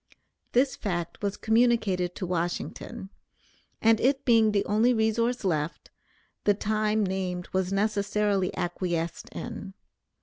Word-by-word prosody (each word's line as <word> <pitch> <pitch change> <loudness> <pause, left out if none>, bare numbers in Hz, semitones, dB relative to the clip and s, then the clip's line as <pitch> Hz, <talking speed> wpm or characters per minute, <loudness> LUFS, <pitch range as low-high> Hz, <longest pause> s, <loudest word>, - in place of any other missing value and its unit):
This 260 +2 +3
fact 175 -5 -4
was 200 -1 -2
communicated 220 -6 +2
to 185 - -4
Washington, 175 +2 -4 0.7
and 225 0 +5
it 270 +3 +1
being 225 -4 +5
the 200 -1 +1
only 225 +4 +3
resource 230 +2 +1
left, 155 -3 -2 0.5
the 205 - +4
time 215 0 +1
named 185 -2 -3
was 190 0 0
necessarily 200 -1 +1
acquiesced 175 -2 -2
in. 205 -5 -7
205 Hz, 115 wpm, -27 LUFS, 180-220 Hz, 0.7 s, and